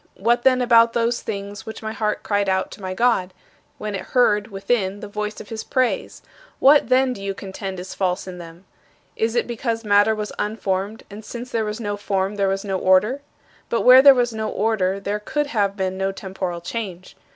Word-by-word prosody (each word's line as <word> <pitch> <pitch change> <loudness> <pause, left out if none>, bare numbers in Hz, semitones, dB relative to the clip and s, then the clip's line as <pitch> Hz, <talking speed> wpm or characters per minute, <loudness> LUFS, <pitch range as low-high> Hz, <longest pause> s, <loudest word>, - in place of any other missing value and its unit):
"What, 235 +4 +2
then, 255 0 +3
about 230 -1 +5
those 235 0 0
things 200 0 -6
which 220 - -8
my 220 - -3
heart 215 -1 -2
cried 205 -1 0
out 190 0 0
to - - -11
my 185 -1 -4
God, 190 -5 +1 0.4
when 210 -1 -5
it 195 - -3
heard, 210 -3 +2
within, 200 -1 -1
the 210 - -7
voice 210 +1 -4
of - - -10
his 225 -1 -5
praise? 255 -2 -1 0.3
What, 280 -2 +5
then, 255 0 +3
do 200 - -10
you 195 0 -3
contend 190 -1 -6
is 185 +1 -7
false 185 -2 -1
in 180 -1 -8
them? 170 +2 -12 0.5
Is 225 +1 -1
it 240 - +2
because 230 -1 -3
matter 205 +1 +4
was 210 -1 -4
unformed, 205 0 -2
and 210 +2 -9
since 240 +3 -8
there 225 -2 0
was 210 +2 -4
no 205 -2 -3
form 195 -1 -1
there 200 -1 0
was 195 +1 -2
no 190 -2 -1
order? 210 +10 +3 0.5
But 230 - 0
where 255 +1 +9
there 275 0 +8
was 240 -2 +1
no 220 0 -3
order 200 -3 0
there 200 +1 -3
could 295 +8 -2
have 205 -8 -1
been 190 -1 -2
no 195 0 0
temporal 190 -3 -5
change. 185 -2 -6
210 Hz, 205 wpm, -22 LUFS, 195-230 Hz, 0.5 s, where